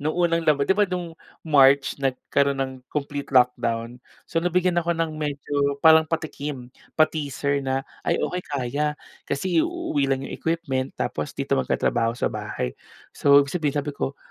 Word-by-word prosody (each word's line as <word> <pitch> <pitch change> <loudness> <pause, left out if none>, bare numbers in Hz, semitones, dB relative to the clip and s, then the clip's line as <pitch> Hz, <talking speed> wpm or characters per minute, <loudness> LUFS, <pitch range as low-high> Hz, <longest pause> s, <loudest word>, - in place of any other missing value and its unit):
nung 155 +3 -2
unang 170 -1 +2
laba 140 -2 +4
di - - +3
ba, 205 0 +2
noong 180 -2 -4 0.3
March 140 -2 +4
nagkaroon 140 +1 0
ng 135 -1 -2 0.2
complete 145 -1 -4
lockdown. 120 -2 +1 0.2
So, 165 - -1
nabigyan 180 0 +1
ako 170 0 -1
ng 165 -1 -1
medyo 145 -1 -1
parang 160 0 +7
patikim, 145 -5 -4 0.2
pa-teaser 145 -3 +1
na, 135 0 -2 0.2
"Ay - - 0
okey, 180 - -2
kaya." 145 +2 -1 0.3
Kasi 165 +4 +1
iuuwi 335 - -1
lang 135 0 0
yung - - -7
equipment 150 -6 -2
tapos 75 0 -3
dito - - -3
magtatrabaho 115 - 0
sa - - -1
bahay. - - -4 0.4
So, 140 0 +5
ibig 140 - -8
sabihin, 150 -5 -1
sabi 145 0 -1
ko, 140 0 -4
145 Hz, 160 wpm, -24 LUFS, 135-160 Hz, 0.4 s, parang